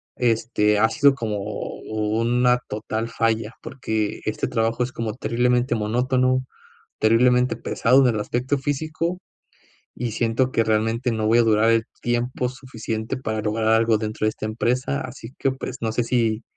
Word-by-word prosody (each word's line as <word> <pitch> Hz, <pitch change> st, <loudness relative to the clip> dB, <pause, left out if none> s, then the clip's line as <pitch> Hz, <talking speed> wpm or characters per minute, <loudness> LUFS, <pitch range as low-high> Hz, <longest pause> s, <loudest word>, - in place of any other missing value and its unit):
este, 115 Hz, -3 st, +1 dB
ha 110 Hz, +1 st, +4 dB
sido 140 Hz, +4 st, +4 dB
como 110 Hz, -5 st, -3 dB, 0.5 s
una 115 Hz, +3 st, +1 dB
total 110 Hz, +2 st, -3 dB
falla, 115 Hz, -1 st, 0 dB
porque 110 Hz, -5 st, -3 dB
este 110 Hz, -, -1 dB
trabajo 115 Hz, +1 st, 0 dB
es 125 Hz, -, -4 dB
como 115 Hz, -3 st, -4 dB
terriblemente 125 Hz, +1 st, +1 dB
monótono, 130 Hz, +4 st, +1 dB, 0.5 s
terriblemente 125 Hz, +3 st, +3 dB
pesado 125 Hz, +3 st, +3 dB
en 120 Hz, -, +1 dB
el 105 Hz, -, -1 dB
aspecto 125 Hz, +6 st, -1 dB
físico, 155 Hz, +5 st, -2 dB, 0.8 s
y 120 Hz, -1 st, -3 dB
siento 120 Hz, +3 st, 0 dB
que 115 Hz, -, +2 dB
realmente 115 Hz, +3 st, 0 dB
no 110 Hz, -1 st, -1 dB
voy 115 Hz, +2 st, +4 dB
a -, -, +5 dB
durar 110 Hz, 0 st, +3 dB
el 115 Hz, 0 st, +3 dB, 0.2 s
tiempo 120 Hz, +1 st, -1 dB
suficiente 115 Hz, -4 st, -5 dB
para 110 Hz, -4 st, -3 dB
lograr 110 Hz, +1 st, -1 dB
algo 115 Hz, 0 st, +4 dB
dentro 110 Hz, 0 st, -3 dB
de 110 Hz, -, +4 dB
esta 110 Hz, -, -6 dB
empresa, 125 Hz, +5 st, -1 dB
así 125 Hz, -1 st, -9 dB
que, 135 Hz, -, +1 dB
pues, 130 Hz, -1 st, -6 dB
no 110 Hz, -, -1 dB
sé 120 Hz, +2 st, 0 dB
si, 115 Hz, -2 st, 0 dB
115 Hz, 160 wpm, -23 LUFS, 110-125 Hz, 0.8 s, a